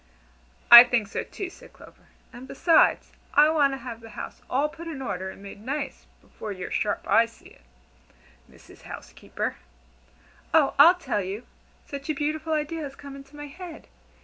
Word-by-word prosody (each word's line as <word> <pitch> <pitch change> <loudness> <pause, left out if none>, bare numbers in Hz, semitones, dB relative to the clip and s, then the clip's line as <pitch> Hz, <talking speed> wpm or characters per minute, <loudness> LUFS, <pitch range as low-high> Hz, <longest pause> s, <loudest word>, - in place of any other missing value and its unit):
"I 235 0 +14
think 245 -4 0
so - - -3
too," 380 -3 -7
said - - -16
Clover; - - -18 0.3
"and 250 +2 -11
beside, 325 +5 +4 0.4
I 300 +1 +7
want 285 -3 +2
to - - -4
have 235 -3 -8
the 225 - -12
house - - -8
all 275 +4 +1
put 330 +2 -11
in 315 -5 -6
order 190 -7 -4
and 195 - -12
made 200 0 -11
nice, 280 +3 -5
before 215 - -9
your 185 -2 -7
sharp 210 - -2
eyes 230 0 +3
see - - -18
it, - - -21 0.9
Mrs. - - -18
Housekeeper. - - -6 1.0
Oh, 300 -4 +4
I'll 335 +6 +9
tell 275 -12 -2
you! 195 +5 -6 0.4
Such 280 0 -8
a 310 - 0
beautiful 310 +2 -2
idea 310 +2 -2
has 275 -2 -7
come 280 -1 -11
into 275 +1 -14
my 295 0 -8
head! 335 +3 -11
275 Hz, 175 wpm, -25 LUFS, 235-310 Hz, 1.0 s, I